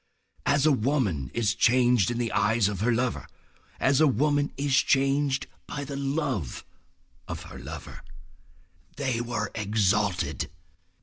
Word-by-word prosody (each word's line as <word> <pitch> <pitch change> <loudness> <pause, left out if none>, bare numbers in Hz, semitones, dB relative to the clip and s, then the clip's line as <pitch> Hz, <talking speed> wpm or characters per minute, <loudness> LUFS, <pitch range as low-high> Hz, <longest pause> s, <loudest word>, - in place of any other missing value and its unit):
As 145 0 +3
a 155 - +6
woman 115 - 0
is 110 -3 +1
changed 120 -3 +3
in 120 - -2
the 120 -2 -1
eyes 110 -1 +2
of 105 -3 -3
her 115 +4 +2
lover, 120 +1 -1 0.5
as 135 +2 +3
a 155 - +6
woman 145 +3 +1
is 140 -1 +1
changed 135 0 +2 0.2
by 145 - -4
the 140 0 -6
love 140 - -2 0.6
of - - -6
a - - -9
lover. - - -8 0.9
They 130 -4 -1
were 120 -3 -3
exalted. 105 -3 0
125 Hz, 135 wpm, -27 LUFS, 105-140 Hz, 0.9 s, a